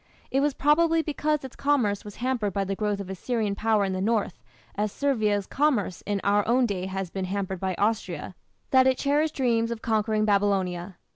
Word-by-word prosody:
It 270 - +2
was 285 -1 +1
probably 325 +3 +3
because 300 -1 -1
its 265 - -8
commerce 245 -9 +1
was 205 -1 -10
hampered 240 -5 -1
by 200 - 0
the 195 0 -2
growth 205 0 -1
of 200 - -6
Assyrian 210 +2 -2
power 215 0 +1
in 190 - -2
the 185 - -2
north, 210 -3 0 0.3
as 210 0 -1
Servia's 215 -8 0
commerce 260 - 0
in 205 -1 0
our 205 +1 +3
own 250 +2 +3
day 190 -4 -2
has 190 -2 -4
been 190 -1 -3
hampered 190 -1 -3
by 190 -1 -2
Austria, 205 -4 -1 0.4
that 260 -1 +6
it 260 -1 +3
cherished 295 +2 +1
dreams 230 -3 +1
of 230 -1 -5
conquering 215 -1 +1
Babylonia. 195 -3 0
210 Hz, 195 wpm, -26 LUFS, 195-260 Hz, 0.4 s, that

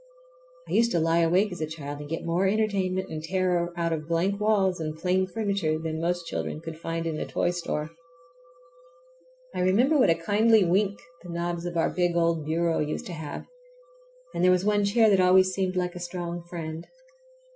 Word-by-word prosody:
I - - -10
used 235 +1 +3
to 170 - +2
lie 165 +1 +2
awake 180 +5 +3
as 180 - -7
a 155 - -1
child 145 -2 -7
and 145 0 -8
get 165 - -4
more 175 +3 +1
entertainment 190 -3 0
and 155 0 -5
terror 180 0 0
out 170 -1 0
of 155 -1 -4
blank 180 +5 0
walls 195 -4 +2
and 155 -1 -4
plain 185 +2 +1
furniture 200 -6 -1
than 160 0 -4
most 175 0 -1
children 155 - -4
could 165 0 -7
find 165 0 -3
in 160 -2 -2
a - - -2
toy 175 - 0
store. 160 -3 -3 1.6
I - - -4
remember 240 +12 +3
what 255 - +5
a 165 - +5
kindly 210 +4 +3
wink 195 +3 +1 0.2
the 175 - -12
knobs 170 0 -3
of 170 -1 -4
our 165 - +2
big 175 -1 0
old 165 -2 +1
bureau 165 +1 0
used 150 0 -2
to 180 - -6
have, 155 -3 -6 0.9
and - - -1
there 185 - +6
was 185 +1 +3
one 205 -1 +2
chair 220 +2 +4
that 200 -3 +4
always 185 0 +5
seemed 185 -1 -1
like 180 -1 -1
a 180 - -8
strong 175 0 -5
friend. 165 -1 -6
175 Hz, 200 wpm, -26 LUFS, 165-190 Hz, 1.6 s, there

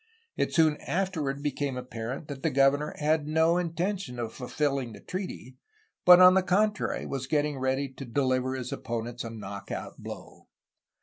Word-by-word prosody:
It - - 0
soon 155 -2 +4
afterward 160 -7 -2
became 145 -2 -2
apparent 125 +3 -5
that 140 -2 -7
the - - +1
governor 140 +2 +2
had 150 0 +1
no 160 +3 +3
intention 175 -3 -2
of 115 -2 -4
fulfilling 135 -2 -2
the - - -11
treaty, 180 -9 -6 0.5
but 180 0 +10
on 185 0 +9
the 190 - +4
contrary 210 +3 +1
was 135 -2 -4
getting 150 -1 0
ready 130 +2 0
to 135 +1 -9
deliver 130 +1 0
his 125 -1 -5
opponents 120 0 -4
a 115 - -5
knock 100 -3 -8
out - - -6
blow. - - -10
140 Hz, 165 wpm, -28 LUFS, 125-160 Hz, 0.5 s, but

